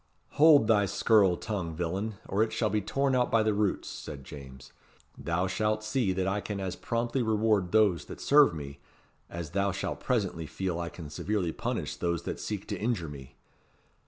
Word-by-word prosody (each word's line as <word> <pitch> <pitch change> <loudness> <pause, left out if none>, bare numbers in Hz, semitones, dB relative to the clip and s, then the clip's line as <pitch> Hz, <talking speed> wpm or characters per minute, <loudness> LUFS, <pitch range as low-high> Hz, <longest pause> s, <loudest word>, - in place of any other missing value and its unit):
"Hold 150 -5 +6
thy 105 -3 +3
scurril 100 -2 +3
tongue, 90 -7 -4
villain, 95 +6 -2
or 100 - 0
it 110 0 +2
shall 110 -3 0
be 105 0 +1
torn 135 +6 0
out 125 -1 +2
by 115 -1 +3
the 110 0 +2
roots," 100 -2 0
said 70 -2 -8
James. 65 -2 -11 0.4
"Thou 85 +2 -1
shalt 105 +3 0
see 110 -2 0
that 95 0 -1
I 100 +2 0
can 100 -1 -4
as 95 -1 -3
promptly 120 +2 -1
reward 110 -5 +1
those 100 -8 +3
that - - -9
serve 145 0 +6
me, 70 -2 -7 0.5
as 85 -3 -6
thou 100 +2 +1
shalt 95 +1 -4
presently 95 - -1
feel 90 -1 -3
I 85 -1 -3
can 80 -4 -10
severely 95 +2 -1
punish - - -3
those 85 -2 -2
that - - -4
seek 105 -2 -4
to - - -3
injure 105 -8 -1
me. 70 -3 -11
100 Hz, 190 wpm, -29 LUFS, 85-110 Hz, 0.5 s, Hold